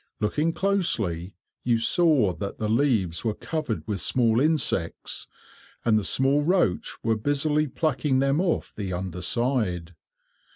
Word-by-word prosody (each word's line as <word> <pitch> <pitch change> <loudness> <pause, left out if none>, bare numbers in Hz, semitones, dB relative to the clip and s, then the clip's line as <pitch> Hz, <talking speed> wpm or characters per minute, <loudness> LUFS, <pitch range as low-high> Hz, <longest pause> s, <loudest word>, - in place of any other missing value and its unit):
Looking 150 +10 0
closely, 110 - 0 0.3
you 120 -1 +2
saw 130 - +3
that 100 +2 -6
the 110 - -2
leaves 110 - +1
were 110 -2 -1
covered 155 -10 -4
with 105 -2 -2
small 115 - +3
insects, 150 - -1 0.6
and 115 -2 +4
the 105 - +2
small 135 +7 +2
roach 170 - +1
were 115 0 +2
busily 145 +6 0
plucking 145 -1 0
them 140 +4 +2
off 180 -3 -1
the 100 -3 -4
under 90 0 -4
side. 105 -10 -1
120 Hz, 135 wpm, -25 LUFS, 100-150 Hz, 0.6 s, and